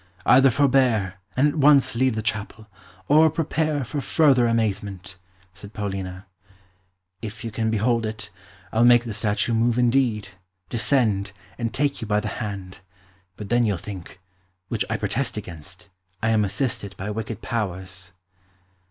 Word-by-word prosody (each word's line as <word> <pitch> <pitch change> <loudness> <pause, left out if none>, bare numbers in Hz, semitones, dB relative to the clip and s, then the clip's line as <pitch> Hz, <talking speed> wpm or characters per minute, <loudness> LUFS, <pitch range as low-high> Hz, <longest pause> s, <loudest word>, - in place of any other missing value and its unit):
"Either 135 +1 +6
forbear, 125 -8 +2 0.2
and 140 +3 +5
at 145 - 0
once 140 -2 +5
leave 130 -1 +2
the 110 - -3
chapel, 110 0 -3 0.4
or 155 +2 +6
prepare 155 -2 -1
for 145 +4 -4
further 135 -3 +4
amazement," 100 -5 -2 0.4
said 100 +3 -12
Paulina. 95 -2 -5 1.0
"If 110 0 -7
you 115 - -4
can 110 +1 -1
behold 110 +1 +1
it, 110 -3 -7 0.4
I'll 115 +1 +3
make 120 0 +6
the 115 -2 -5
statue 105 +2 0
move 115 +1 +2
indeed, 120 -4 +2 0.4
descend, 110 -5 +1 0.3
and 115 -2 -1
take 140 +1 -1
you 110 - -4
by 105 0 +2
the 105 - -3
hand. 95 -3 -6 0.6
But 105 -2 -7
then 120 0 +3
you'll 105 -5 +1
think 90 -1 -9 0.5
which - - 0
I - - 0
protest 125 -2 -2
against 95 +1 -9 0.3
I 110 - +2
am 110 -1 +3
assisted 100 -1 -2
by 100 +3 -4
wicked 110 0 -5
powers." 95 -4 -4
110 Hz, 150 wpm, -24 LUFS, 100-125 Hz, 1.0 s, Either